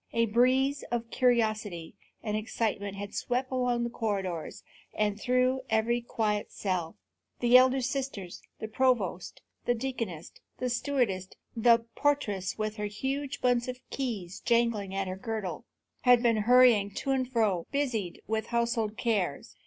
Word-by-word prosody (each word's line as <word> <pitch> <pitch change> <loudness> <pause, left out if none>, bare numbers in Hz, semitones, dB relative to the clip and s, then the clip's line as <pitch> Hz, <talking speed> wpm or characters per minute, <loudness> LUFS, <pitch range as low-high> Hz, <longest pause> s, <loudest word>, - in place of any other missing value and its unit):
A 230 0 +3
breeze 255 +5 +2
of 235 -1 -3
curiosity 215 -8 +1 0.3
and 210 -2 -2
excitement 210 -2 -2
had 200 0 -6
swept 255 +2 -2
along 250 -2 +1
the 235 - -1
corridors 195 -8 -3 0.3
and 210 -1 0
through 255 +1 +2
every 225 +2 +1
quiet 215 -3 -1
cell. 180 -4 -3 0.4
The 240 0 +4
elder 260 +1 +6
sisters, 255 -8 -4 0.2
the 220 - -5
provost, 220 -7 0 0.2
the 245 - +2
deaconess, 230 -10 -4 0.3
the 250 -1 -2
stewardess, 240 -7 0 0.3
the 230 0 +4
portress 210 -11 0
with 215 0 -3
her 210 0 -2
huge 270 +6 -3
bunch 245 -1 +2
of 250 0 -4
keys 215 -10 -4
jingling 230 -5 +1
at 195 -1 -1
her 185 0 -4
girdle, 220 -1 -4 0.3
had 245 -1 +5
been 230 -2 +3
hurrying 230 -2 +5
to 275 - -2
and 260 -1 0
fro, 210 -8 +1
busied 250 -11 -2
with 220 0 -2
household 235 -2 0
cares. 200 - -1
230 Hz, 145 wpm, -29 LUFS, 205-250 Hz, 0.4 s, elder